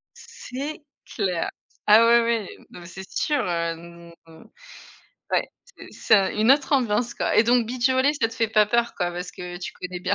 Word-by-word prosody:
C'est 280 +4 -8 0.3
clair! 185 -6 -1 0.4
Ah 220 +2 +7
oui, 230 -3 +3
oui, - - -21
non - - -12
mais 170 - -11
c'est 190 +1 -10
sûr, 295 -3 0
heu, 170 0 -5 1.2
ouais - - 0 0.2
c'est - - -15
c'est 200 -4 +2
une 220 +4 +3
autre 290 +1 0
ambiance 240 -2 +1
quoi - - -1
et - - +7
donc 240 -1 +2
beach 250 +1 0
volley 260 +3 +3
ça 230 -6 0
te 225 - -11
fait 225 -3 0
pas 215 -1 +4
peur 235 +2 0
quoi 175 0 -1
parce 180 +1 -6
que 175 0 -8
tu 180 - -6
connais 180 -1 -7
bien. 200 +2 0
220 Hz, 190 wpm, -23 LUFS, 180-245 Hz, 1.2 s, Ah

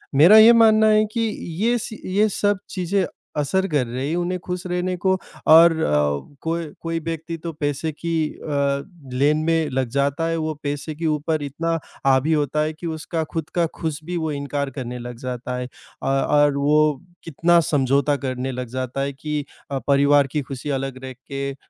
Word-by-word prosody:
मेरा 175 +10 +8
ये 225 +2 +9
मानना 220 0 +5
है 215 0 +4
कि 230 - 0 0.4
ये 240 +1 +3
सी 220 - -10 0.2
ये 215 0 +4
सब 205 -1 +2
चीज़ें 185 0 0 0.3
असर 190 +7 +1
कर 145 -6 +1
रही 130 +4 -3
हैं 165 - -1
उन्हें 180 +1 -1
खुश 180 +1 -5
रहने 180 +1 -1
को 190 - +5 0.4
और 165 +2 +9
अ, 75 - 0
कोई 165 0 -2 0.2
कोई 165 0 -2
व्यक्ति 165 0 -4
तो 165 - -3
पैसे 145 +1 -2
की 165 +2 -4 0.2
अ, 140 -2 -1 0.3
लेन 145 +4 +3
में 165 -2 +1
लग 130 -2 -1
जाता 140 +4 0
है, 165 - 0
वो 155 -1 -2
पैसे 145 +2 -3
के 165 +1 -5
ऊपर 155 0 0
इतना 165 +4 -2 0.3
हावी 135 +4 +3
होता 150 0 0
है 155 +1 -2
कि 170 +2 -7
उसका 160 +1 -3
खुद 160 -2 -3
का 170 -1 +3
खुश 160 -2 -3
भी 175 +2 -4
वो 160 -2 -2
इनकार 140 0 -3
करने 125 -3 -6
लग 120 0 -7
जाता 125 0 -4
है, 125 - -3 0.4
अ - - -2
और 140 +1 +3
वो 150 0 +2 0.2
कितना 170 +2 +3
समझौता 140 0 +2
करने 130 -1 -3
लग 125 -1 -5
जाता 130 +2 -3
है 140 0 -2
कि 150 +1 -4 0.3
अ, 135 - -1
परिवार 140 0 +4
की 150 +2 -2
खुशी 135 +1 -7
अलग 135 -1 -3
रख 130 -1 -7 0.2
के 140 0 -2
अ, - - -9
150 Hz, 195 wpm, -22 LUFS, 135-165 Hz, 0.4 s, ये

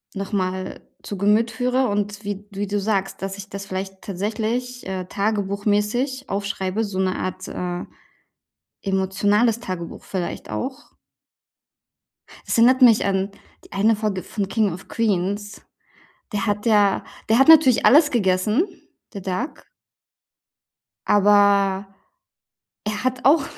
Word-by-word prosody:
noch 195 +1 -5
mal 185 -2 -2 0.2
zu 205 - -6
Gemüt 210 +4 +2
führe. 250 +3 +1
Und 205 0 -2
wie 205 0 -5
wie 200 +1 -3
du 205 +1 -1
sagst, 195 -2 -1
dass 195 0 -4
ich 200 0 -9
das 195 0 -7
vielleicht 190 0 -5
tatsächlich, 225 +5 -3
äh, 190 -1 -4
tagebuchmäßig 210 +6 -1
aufschreibe, 200 +1 -2
so 195 -2 -4
'ne 185 -1 0
Art, 185 0 -4
äh, 175 -1 -4 1.0
emotionales 205 +4 +1
Tagebuch 185 -7 -6
vielleicht 185 -3 -5
auch. 260 +1 -5 1.6
Es - - 0
erinnert 255 +3 +5
mich 235 -4 +6
an 195 0 0 0.3
die - - -18
eine 215 +3 +3
Folge 210 -3 -2
von 200 -3 -3
„King 210 0 +1
of 180 - -10
Queens“, 205 -1 -1 0.7
der 205 -2 -1
hat 205 +1 -1
ja 205 -3 +3 0.3
der 225 - +5
hat 270 - +5
natürlich 305 -7 +7
alles 295 +2 +6
gegessen, 210 - +2 0.5
der 200 - -6
Doug. 185 - -4 1.4
Aber, 200 -1 +4 1.0
er 210 +1 -3
hat 255 0 -2
auch 285 +1 +5
205 Hz, 130 wpm, -22 LUFS, 195-225 Hz, 1.6 s, natürlich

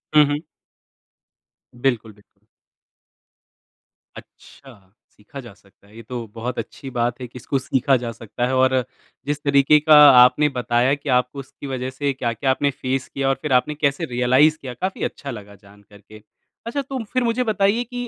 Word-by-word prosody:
हुँ, 150 - +8
हुँ। 145 +1 -2 1.3
बिल्कुल, 120 -4 -2
बिल्कुल। 105 0 -29 1.7
अच्छा, 135 -2 -16 0.4
सीखा 110 +6 -12
जा 120 -6 -11
सकता 100 0 -26
है। 105 - -20
ये 115 - -11
तो 120 0 -6
बहुत 125 +3 -4
अच्छी 130 +4 -8
बात 120 +1 -1
है 125 - -5
कि 125 - -13
इसको 135 - -2
सीखा 135 +1 +2
जा 115 - -3
सकता 115 +2 -5
है 130 - -2
और 130 0 +3 0.5
जिस 145 0 -3
तरीके 140 +1 +4
का 155 0 +5 0.3
आपने 150 +4 +4
बताया 120 +2 +1
कि 145 - -5
आपको 125 +3 -3
उसकी 135 +1 -10
वजह 130 0 -3
से 140 +1 -2
क्या-क्या 125 +1 -1
आपने 140 +2 0
फेस 130 0 -2
किया 135 0 -2
और 135 - +2
फिर 150 -4 -2
आपने 150 +4 -7
कैसे 140 +4 +1
रियलाइज़ 130 +6 +3
किया, 130 -2 -7
काफ़ी 185 +9 -4
अच्छा 140 -2 -8
लगा 100 -3 -10
जान 100 +1 -18
कर 100 0 -17
के। 110 +1 -16 0.4
अच्छा 280 +5 -3
तो 265 -3 -5
फिर 255 -1 +1
मुझे 235 +2 0
बताइए 215 +1 +1
कि 245 0 -6
130 Hz, 180 wpm, -21 LUFS, 120-150 Hz, 1.7 s, हुँ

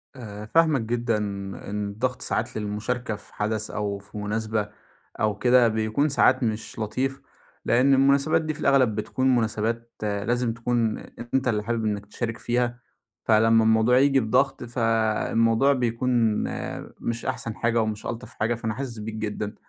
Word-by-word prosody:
آآ، 105 -4 -8
فاهماك 155 0 +3
جدًا، 115 0 0 0.5
إن 105 0 -2
الضغط 125 +4 -2
ساعات 115 +1 -2
للمشاركة 110 +3 -3
في 105 - -16
حدث 110 +1 -2
أو 100 -1 -2
في 100 +1 -12
مناسبة 105 0 -2 0.5
أو 105 -1 +1
كده 125 +1 +5
بيكون 110 +7 0
ساعات 130 -1 +3
مش 110 +1 -3
لطيف، 130 +5 -2 0.4
لأن 130 +3 +4
المناسبات 140 +4 +4
دي 155 -1 -2
في 150 - -12
الأغلب 130 -8 +3
بتكون 130 +4 +1
مناسبات 115 +1 -1
لازم 115 +3 0
تكون 115 -1 0 0.4
أنت 135 -1 +2
اللي 105 -3 +1
حابب 115 0 -1
إنك 105 -1 -2
تشارك 115 +2 -4
فيها، 120 0 -1 0.4
فلمّا 115 +1 +4
الموضوع 110 +2 +4
ييجي 135 0 +4
بضغط 130 +4 +1
فالموضوع 115 +2 +2
بيكون 125 0 -1 0.9
مش 115 0 -3
أحسن 115 -4 -3
حاجة 120 -1 +1
ومش 110 -1 -3
ألطف 120 +2 -6
حاجة، 115 +2 0
فأنا 110 -1 -3
حاسس 125 -1 -5
بيك 110 +1 -5
جدًا. 105 -1 -4
115 Hz, 150 wpm, -25 LUFS, 110-125 Hz, 0.9 s, كده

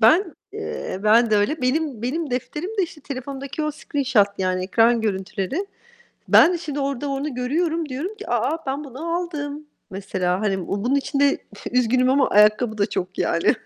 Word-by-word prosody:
Ben, 330 - +4 0.2
eee 185 - -5
ben 225 +2 +5
de 210 - +4
öyle. 255 +8 0
Benim 260 -3 0
benim 290 +3 -2
defterim 300 - -3
de - - +4
işte 325 -3 -5
telefondaki 275 +2 -5
o 305 - 0
screenshot, 265 -8 +1
yani, 185 -1 0
ekran 230 +4 +3
görüntüleri. 210 - -2 0.6
Ben 355 - +7
de - - 0
şimdi 295 -3 -4
orada 275 0 -2
onu 275 0 -3
görüyorum. 315 +5 -1
Diyorum 320 +12 -4
ki - - -9
"A! 325 -1 0
Ben 275 +3 -2
bunu 305 +6 -4
aldım." 300 -4 -4 0.2
mesela. 185 -2 -2
Hani, 195 -4 -1
bunun 230 +8 0
içinde 280 0 +2 0.3
üzgünüm 250 +1 +3
ama 270 0 +3
ayakkabı 215 +2 +4
da 200 - +3
çok 185 +1 -4
yani. 170 - +2
265 Hz, 165 wpm, -23 LUFS, 215-300 Hz, 0.6 s, Ben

